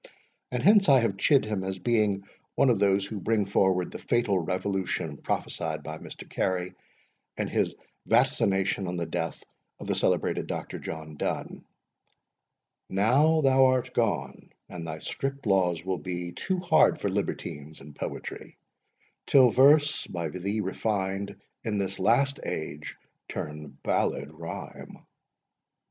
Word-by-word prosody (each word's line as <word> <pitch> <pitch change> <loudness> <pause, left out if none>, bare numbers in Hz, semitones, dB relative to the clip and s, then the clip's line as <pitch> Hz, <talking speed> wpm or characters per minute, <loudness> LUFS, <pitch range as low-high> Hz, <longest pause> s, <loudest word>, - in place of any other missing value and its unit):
And 125 -1 -2
hence 200 0 +6
I 135 -2 +7
have 105 -4 0
chid 135 +5 +4
him 105 -3 -2
as 95 0 -3
being 105 -3 +1 0.3
one 135 - +4
of 110 - +1
those 100 -1 +3
who 105 0 -5
bring 110 +1 +1
forward 95 -2 +2
the - - -7
fatal 115 -5 +1
revolution 90 -3 -2
prophesied 80 +1 -3
by 80 +1 -6
Mr. - - -9
Robert - - -22
Carey, 90 -1 -1 0.6
in - - -1
his - - 0 0.3
Vaticination 110 -6 +2
on 90 0 -3
the 85 - -1
Death 80 0 -4 0.4
of - - -8
the - - 0
celebrated - - 0
Dr. - - -5
John 80 -1 -7
Donne: - - -3 1.3
Now 140 +11 +3
thou 135 -1 +5
art 130 -1 +1
gone, - - -1 0.2
and 85 -2 -7
thy 80 - -4
strict 135 - -4
laws 90 -4 +2
will 95 -2 -1
be 90 +2 -4
Too 185 - -2
hard 180 0 +4
for - - -1
libertines 75 +2 -4
in 75 +1 -12
poetry; - - -7 0.7
Till 130 -3 +6
verse 145 +4 +5
(by 85 -2 -3
thee 100 +5 -2
refined) 100 0 -2 0.3
in 110 -4 -1
this 95 -1 -2
last 135 +8 +3
age 75 -1 -5 0.3
Turn 75 -1 -6
ballad - - 0
rhyme. - - -9
100 Hz, 145 wpm, -27 LUFS, 90-120 Hz, 1.3 s, I